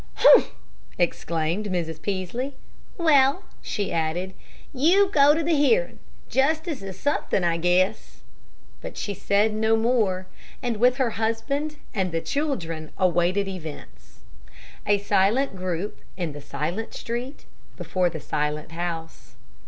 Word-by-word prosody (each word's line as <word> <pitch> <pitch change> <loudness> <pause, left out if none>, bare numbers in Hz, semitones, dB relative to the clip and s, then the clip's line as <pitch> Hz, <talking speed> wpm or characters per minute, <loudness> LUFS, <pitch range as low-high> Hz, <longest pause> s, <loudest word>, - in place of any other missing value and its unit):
"Humph!" - - +6 0.4
exclaimed 170 +2 -1
Mrs. 165 -4 -3
Peaslee. 205 +8 -3 0.4
"Well," 300 0 +4 0.2
she 205 - -3
added, 170 +4 -1 0.4
"you 355 +9 +4
go 290 0 +6
to 325 - 0
the 335 +2 +1
hearin'. 455 - +2 0.3
Justice 310 +2 0
is 190 -1 -8
suthin', 285 -9 0
I 170 -1 +2
guess." 180 +4 0 0.6
But - - -8
she 205 - -3
said 205 +3 +1
no 220 +1 +2
more, 220 -6 +1 0.4
and 240 -3 -1
with 250 +3 +4
her 255 -4 +1
husband 275 +7 -1 0.2
and 190 -5 -1
the 165 - 0
children 165 - -3
awaited 185 +2 +2
events 145 - -9 0.7
a 205 - +4
silent 200 +5 +2
group 185 +1 -3 0.2
in 175 -4 -2
the 145 0 -9
silent 170 +12 -4
street 245 +4 -5 0.3
before 180 -2 0
the 160 - -6
silent 150 +1 -2
house. 165 -5 -6
200 Hz, 130 wpm, -25 LUFS, 170-260 Hz, 0.7 s, Humph